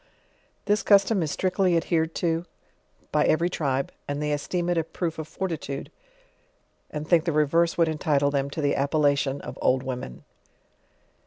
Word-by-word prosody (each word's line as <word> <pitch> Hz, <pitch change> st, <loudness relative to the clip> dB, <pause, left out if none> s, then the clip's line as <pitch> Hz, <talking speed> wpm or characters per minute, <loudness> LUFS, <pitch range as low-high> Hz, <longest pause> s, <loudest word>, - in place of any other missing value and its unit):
This 210 Hz, +1 st, +2 dB
custom 200 Hz, 0 st, +4 dB
is 160 Hz, -, -1 dB
strictly 185 Hz, +1 st, +1 dB
adhered 165 Hz, -1 st, 0 dB
to 165 Hz, 0 st, 0 dB, 0.7 s
by -, -, +3 dB
every 170 Hz, +3 st, +2 dB
tribe, 140 Hz, -5 st, -1 dB, 0.2 s
and 145 Hz, 0 st, -3 dB
they 150 Hz, 0 st, -1 dB
esteem 170 Hz, +4 st, -2 dB
it 175 Hz, -1 st, +1 dB
a -, -, 0 dB
proof 165 Hz, 0 st, -4 dB
of 155 Hz, -, -5 dB
fortitude, 155 Hz, -5 st, -4 dB, 1.0 s
and 150 Hz, 0 st, -5 dB
think 170 Hz, -2 st, +4 dB
the 170 Hz, -, +1 dB
reverse 160 Hz, +3 st, +2 dB
wo^d 165 Hz, -1 st, +3 dB
entitle 145 Hz, -2 st, +1 dB
them 140 Hz, -1 st, 0 dB
to 155 Hz, -, -4 dB
the 145 Hz, -, +1 dB
appellation 140 Hz, -1 st, +1 dB
of -, -, -8 dB
old 130 Hz, 0 st, +2 dB
women. 125 Hz, -, -6 dB
155 Hz, 160 wpm, -26 LUFS, 140-170 Hz, 1.0 s, custom